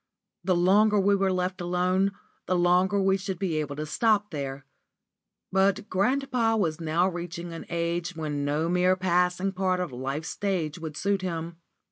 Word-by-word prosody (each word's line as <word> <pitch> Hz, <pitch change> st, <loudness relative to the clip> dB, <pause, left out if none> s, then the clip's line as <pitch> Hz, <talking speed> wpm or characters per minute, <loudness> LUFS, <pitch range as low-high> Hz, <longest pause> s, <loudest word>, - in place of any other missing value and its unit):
The 185 Hz, 0 st, +2 dB
longer 205 Hz, +4 st, +4 dB
we 200 Hz, +1 st, +3 dB
were 195 Hz, -1 st, +1 dB
left 185 Hz, +1 st, -2 dB
alone, 180 Hz, +2 st, +1 dB, 0.3 s
the 185 Hz, -, +1 dB
longer 180 Hz, +3 st, +3 dB
we 195 Hz, 0 st, +3 dB
should 190 Hz, -1 st, -4 dB
be 175 Hz, -5 st, -1 dB
able 145 Hz, -2 st, -2 dB
to 150 Hz, +1 st, -4 dB
stop 210 Hz, +6 st, +1 dB
there. 140 Hz, -2 st, -5 dB, 0.9 s
But 195 Hz, +2 st, +1 dB
grandpapa 235 Hz, +2 st, +1 dB
was 165 Hz, -5 st, -1 dB
now 165 Hz, +2 st, +2 dB
fast 185 Hz, -, -4 dB
reaching 170 Hz, 0 st, -6 dB
an 165 Hz, -, -8 dB
age 170 Hz, +1 st, -2 dB
when 150 Hz, -3 st, -3 dB
no 150 Hz, +3 st, 0 dB
mere 180 Hz, +1 st, +3 dB
passive 180 Hz, +1 st, +1 dB
part 185 Hz, -1 st, 0 dB
on 180 Hz, -6 st, -3 dB
life's 135 Hz, +6 st, -4 dB
stage 180 Hz, -6 st, -2 dB
would 155 Hz, -2 st, -6 dB
suit 200 Hz, -1 st, 0 dB
him. 170 Hz, -2 st, -4 dB
180 Hz, 170 wpm, -27 LUFS, 165-195 Hz, 0.9 s, longer